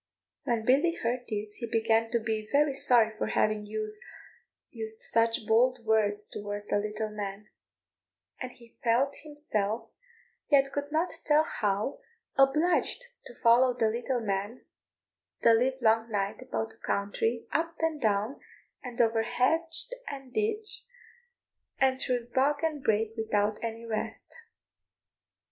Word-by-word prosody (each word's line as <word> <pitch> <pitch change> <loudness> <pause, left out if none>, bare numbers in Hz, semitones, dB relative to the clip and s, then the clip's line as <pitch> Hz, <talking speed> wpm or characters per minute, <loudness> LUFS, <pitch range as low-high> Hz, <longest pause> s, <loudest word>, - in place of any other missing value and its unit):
When 235 -4 0
Billy 290 +7 +3
heard 245 -1 -2
this 210 -1 -4
he 235 - -4
began 225 0 +2
to 235 - +2
be 215 -1 -3
very 285 0 +3
sorry 235 -5 +4
for - - 0
having 215 -1 +1
used 215 0 -4 1.0
such 230 -1 +1
bold 240 +2 +3
words 210 -1 +2
towards 205 0 -5
the 205 - +1
little 215 +1 -3
man; 205 0 -6 0.9
and 255 -1 -4
he 235 -2 -19
felt 245 +4 +2
himself, 240 -8 -3 0.6
yet 275 -2 +4
could 285 +1 -4
not 320 +4 +1
tell 300 +1 +4
how, 210 -2 -1 0.4
obliged 330 - +3
to - - -12
follow 245 +2 +4
the 225 -2 +3
little 240 +2 -2
man 205 +3 -3 0.8
the 230 - +7
live 255 +3 +2
long 225 +1 +3
night 200 +1 -2
about 225 -3 -3
the 220 - -19
country, 225 +4 -1
up 330 +2 -1
and 320 -2 -1
down, 215 +4 0 0.4
and 245 -2 -8
over 225 -1 +3
hedge 320 +8 +1 0.2
and 270 -3 -7
ditch, 430 0 -1 0.9
and 265 -1 +2
through 245 -2 -1
bog 285 +3 +2
and 305 -4 -1
brake, 220 0 +1
without 215 -1 0
any 230 0 -4
rest. 220 -2 -4
230 Hz, 135 wpm, -29 LUFS, 215-270 Hz, 1.0 s, the